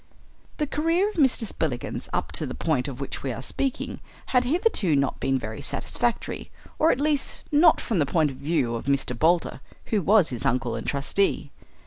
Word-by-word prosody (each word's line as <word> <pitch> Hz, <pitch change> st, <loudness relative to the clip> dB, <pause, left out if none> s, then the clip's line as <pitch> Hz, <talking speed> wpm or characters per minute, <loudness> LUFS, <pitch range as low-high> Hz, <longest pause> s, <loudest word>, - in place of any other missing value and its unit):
The 300 Hz, -, 0 dB
career 330 Hz, +7 st, +1 dB
of 425 Hz, -, -10 dB
Mr. 265 Hz, -6 st, +3 dB
Spillikins 155 Hz, -, -3 dB
up -, -, -2 dB
to -, -, -1 dB
the -, -, -5 dB
point 145 Hz, -6 st, 0 dB
of 135 Hz, -2 st, -6 dB
which 140 Hz, -, -5 dB
we 135 Hz, -, -2 dB
are 120 Hz, +2 st, -6 dB
speaking 270 Hz, -, -3 dB, 0.3 s
had 250 Hz, -1 st, +4 dB
hitherto 255 Hz, -, +2 dB
not 140 Hz, -1 st, 0 dB
been 135 Hz, 0 st, +1 dB
very 110 Hz, -3 st, -6 dB
satisfactory, 240 Hz, -1 st, -1 dB, 0.3 s
or 315 Hz, -, +5 dB
at 250 Hz, -, +2 dB
least 295 Hz, -1 st, 0 dB
not 310 Hz, +2 st, +6 dB
from 215 Hz, -7 st, -1 dB
the 145 Hz, -, +2 dB
point 155 Hz, -2 st, +2 dB
of 130 Hz, -, -10 dB
view 140 Hz, -6 st, 0 dB
of 115 Hz, -, -4 dB
Mr. 140 Hz, -2 st, 0 dB
Boulder, 165 Hz, 0 st, +1 dB, 0.2 s
who 215 Hz, -3 st, 0 dB
was 195 Hz, -1 st, +4 dB
his 125 Hz, -3 st, -4 dB
uncle 125 Hz, -3 st, 0 dB
and -, -, -5 dB
trustee. 145 Hz, +1 st, 0 dB
165 Hz, 190 wpm, -25 LUFS, -, 0.3 s, not